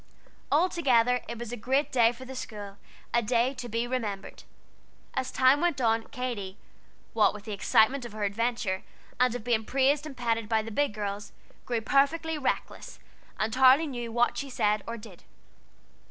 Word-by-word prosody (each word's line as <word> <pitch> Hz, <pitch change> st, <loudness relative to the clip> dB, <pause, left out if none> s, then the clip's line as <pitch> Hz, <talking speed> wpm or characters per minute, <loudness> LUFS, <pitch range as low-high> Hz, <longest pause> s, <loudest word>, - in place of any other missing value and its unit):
Altogether 265 Hz, -7 st, +3 dB
it 235 Hz, -, -5 dB
was 235 Hz, 0 st, -6 dB
a -, -, -3 dB
great 265 Hz, +5 st, 0 dB
day 235 Hz, -3 st, +4 dB
for 250 Hz, +2 st, -11 dB
the 265 Hz, -, -8 dB
school, 205 Hz, -5 st, -7 dB, 0.4 s
a 235 Hz, -, +4 dB
day 240 Hz, +3 st, +1 dB
to 250 Hz, -2 st, -7 dB
be 230 Hz, +2 st, -1 dB
remembered. 220 Hz, -6 st, -4 dB, 0.7 s
As 260 Hz, 0 st, -2 dB
time 260 Hz, +2 st, +4 dB
went 345 Hz, -5 st, +1 dB
on, 225 Hz, -2 st, +2 dB
Katy, 235 Hz, -8 st, -5 dB, 0.6 s
what 210 Hz, -2 st, +3 dB
with 205 Hz, -, -9 dB
the 220 Hz, -, -6 dB
excitement 220 Hz, +6 st, +3 dB
of 240 Hz, -, -7 dB
her 215 Hz, 0 st, -5 dB
adventure, 205 Hz, -2 st, -1 dB, 0.4 s
and 250 Hz, -1 st, +3 dB
of 245 Hz, -, -5 dB
being 230 Hz, -2 st, +1 dB
praised 275 Hz, +5 st, +1 dB
and 275 Hz, -4 st, -10 dB
petted 230 Hz, -3 st, -1 dB
by 220 Hz, -1 st, +2 dB
the 225 Hz, -, -7 dB
big 285 Hz, -1 st, 0 dB
girls, 205 Hz, -1 st, -5 dB, 0.3 s
grew 235 Hz, -2 st, 0 dB
perfectly 305 Hz, +6 st, +1 dB
reckless, 270 Hz, -, -3 dB, 0.4 s
and 220 Hz, +1 st, -1 dB
hardly 265 Hz, +4 st, +6 dB
knew 240 Hz, -5 st, -5 dB
what 240 Hz, +1 st, +1 dB
she 280 Hz, -, -5 dB
said 210 Hz, -4 st, +1 dB
or 230 Hz, 0 st, -4 dB
did. 210 Hz, -5 st, -13 dB
240 Hz, 175 wpm, -28 LUFS, 220-260 Hz, 0.7 s, hardly